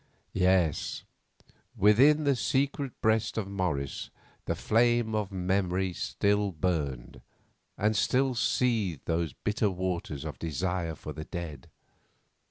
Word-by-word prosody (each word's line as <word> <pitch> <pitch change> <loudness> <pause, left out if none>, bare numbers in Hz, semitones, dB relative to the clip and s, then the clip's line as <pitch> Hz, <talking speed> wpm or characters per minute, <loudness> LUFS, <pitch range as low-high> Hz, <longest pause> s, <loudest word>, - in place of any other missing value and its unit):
Yes, 90 -4 +1 0.7
within 130 +10 +5
the 140 -2 +3
secret 135 +1 -1
breast 110 0 +1
of 105 -3 -1
Morris 90 -9 -2 0.4
the - - -1
flame 120 0 +2
of 105 -2 -1
memory 95 0 0
still 100 +2 0
burned, 75 -8 -2 0.6
and 105 +2 +1
still 130 +5 +2
seethed 115 - 0
those 85 -3 -1
bitter 105 0 0
waters 90 -6 -3
of 75 -6 -6
desire 85 +1 -2
for 75 - -8
the 75 +2 -7
dead. 85 -7 -7
95 Hz, 115 wpm, -29 LUFS, 85-110 Hz, 0.7 s, within